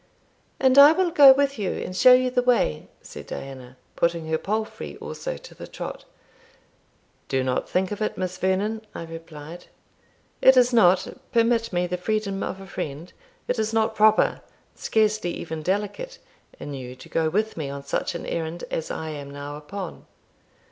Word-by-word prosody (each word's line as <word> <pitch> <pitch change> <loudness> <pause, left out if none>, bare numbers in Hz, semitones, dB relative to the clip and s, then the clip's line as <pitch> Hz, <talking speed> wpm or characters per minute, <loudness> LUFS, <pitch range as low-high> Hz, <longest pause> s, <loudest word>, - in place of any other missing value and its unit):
"And 260 +1 +5
I 290 +2 +10
will 360 0 +1
go 285 -4 +9
with 275 -2 +2
you, 195 - -1
and 185 - -5
show 250 +6 +7
you 255 0 +3
the 250 0 +2
way," 245 - +1 0.2
said - - -10
Diana, 130 -2 -8 0.2
putting 170 -1 0
her 160 0 0
palfrey 215 +2 -4
also - - -6
to - - -13
the - - -10
trot. - - -7 1.2
"Do 135 -1 0
not 130 -1 -1
think 185 +1 0
of 205 - -5
it, 215 - -2
Miss 185 -1 -3
Vernon," 200 +4 0
I - - -5
replied. 165 0 -10 0.8
"It 265 0 +7
is 250 0 +5
not 185 -5 +5 0.2
permit 230 -1 +2
me 175 -1 0
the 180 0 -3
freedom 200 +1 -2
of 190 - -4
a 195 - -10
friend 155 -1 -6 0.3
it 250 - -1
is 220 0 -1
not 220 -1 +2
proper, 215 0 +3 0.3
scarcely 215 -5 0
even 160 -1 -6
delicate, 205 - -3 0.4
in 145 - -6
you 125 -2 -7
to 130 - -14
go 160 -1 0
with 215 +6 -1
me 150 -4 -4
on 140 0 -6
such 140 - -2
an - - -5
errand 165 +1 -4
as 160 - -3
I 160 - -4
am 145 -2 -7
now 145 +1 -7
upon." 170 +5 -8
190 Hz, 175 wpm, -24 LUFS, 160-225 Hz, 1.2 s, I